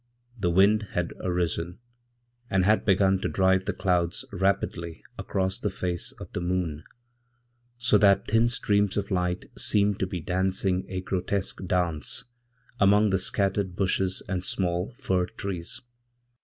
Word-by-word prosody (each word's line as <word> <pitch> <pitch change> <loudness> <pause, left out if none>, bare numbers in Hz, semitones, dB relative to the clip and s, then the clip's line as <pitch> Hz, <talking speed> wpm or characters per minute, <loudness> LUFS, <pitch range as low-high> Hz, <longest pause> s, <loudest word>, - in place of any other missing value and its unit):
The 100 -7 0
wind 100 +4 +4
had 90 -1 -1
arisen, 90 -1 -2 0.7
and 95 -1 +2
had 110 +2 +3
begun 95 -1 +3
to - - -1
drive 95 0 +2
the - - 0
cloudsrapidly 90 -1 -1 0.2
across 95 -1 -1
the 105 - -1
face 90 -2 -2
of - - -11
the - - -2
moon, 85 -4 -2 0.9
so 120 -3 +3
that 100 -1 +4
thin 115 +2 +3
streams 105 -4 +1
of 100 0 -2
lightseemed 95 +3 0
to 95 - 0
be 90 -1 -4
dancing 95 +2 0
a 95 -1 -3
grotesque 95 +1 -2
dance 85 -4 0 0.6
among 105 +1 +5
the 95 - +2
scattered 95 -1 +1
bushes 95 0 0
andsmall 90 +2 -1
fir 90 -1 0
trees. 90 -4 -5
95 Hz, 130 wpm, -27 LUFS, 90-100 Hz, 0.9 s, among